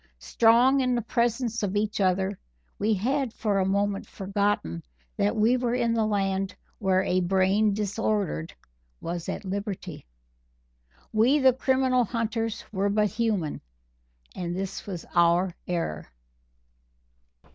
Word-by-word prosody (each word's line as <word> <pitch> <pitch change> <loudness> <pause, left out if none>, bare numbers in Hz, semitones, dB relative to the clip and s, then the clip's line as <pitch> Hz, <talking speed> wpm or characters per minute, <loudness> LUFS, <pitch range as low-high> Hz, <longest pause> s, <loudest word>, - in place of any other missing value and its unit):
Strong 235 - +4
in 250 -1 +1
the 240 - 0
presence 235 0 0
of 200 -1 -2
each 210 0 0
other, 190 +1 +1 0.4
we 215 +1 +2
had 260 +5 0
for 210 -3 0
a 190 - +2
moment 200 0 0
forgotten 195 - -1 0.3
that 100 +8 +1
we 225 +4 +3
were 245 -1 0
in 235 -2 +1
the 225 -2 +1
land 195 -2 -1 0.2
where 190 -2 +2
a 185 -1 +1
brain 190 +3 +2
disordered 205 -4 -1 0.5
was 170 0 -5
at - - -4
liberty. 190 -5 -5 1.1
We, 235 +7 +4
the 265 -3 +5
criminal 260 -1 +2
hunters, 225 -1 -2
were 200 0 0
but 210 +1 +2
human 210 -10 -1 0.7
and 175 -1 -3
this 195 +2 -5
was 180 -4 -6
our 175 +1 +3
error. 165 - -3
205 Hz, 130 wpm, -26 LUFS, 190-230 Hz, 1.1 s, the